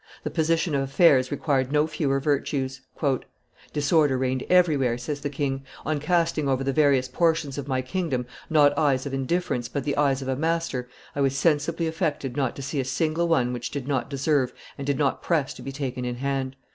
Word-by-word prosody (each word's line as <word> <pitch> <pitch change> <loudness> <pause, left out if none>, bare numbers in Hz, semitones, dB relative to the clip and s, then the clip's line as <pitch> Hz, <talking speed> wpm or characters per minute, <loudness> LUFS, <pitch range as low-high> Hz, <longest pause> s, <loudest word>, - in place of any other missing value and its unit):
The - - -3
position 165 0 +1
of 140 - +2
affairs 135 -1 +4
required 140 -2 0
no 150 0 +3
fewer 140 -3 0
virtues. 135 -2 -1 0.9
"Disorder 145 -2 +3
reigned 130 0 -1
everywhere," 150 -10 +3
says 145 +4 -4
the 145 - -2
king; 135 -1 -2 0.2
"on 155 0 0
casting 165 -2 +1
over 135 0 +1
the 135 0 0
various 140 -4 +3
portions 160 -5 0
of 140 - -6
my 130 -2 0
kingdom 130 -3 -2 0.2
not 145 -2 +5
eyes 140 -3 +2
of 140 - -4
indifference, 135 -2 -1
but 140 +2 -3
the 145 0 -1
eyes 140 -2 +2
of - - -7
a 130 - 0
master, 160 -4 -1 0.3
I 140 - -1
was 135 0 +1
sensibly 160 +3 +1
affected 160 -6 -2
not 135 -4 0
to 140 - -7
see 140 +2 -2
a - - +1
single 155 +6 0
one 125 -7 +2
which 120 -1 -4
did 140 -2 -5
not 140 -1 -1
deserve 140 -1 +1 0.2
and 140 - -6
did 140 -2 +1
not 140 -2 +1
press 155 -6 0
to - - -12
be 135 - -5
taken 135 -3 -4
in 125 0 -2
hand. 135 0 -2
140 Hz, 200 wpm, -25 LUFS, 130-155 Hz, 0.9 s, not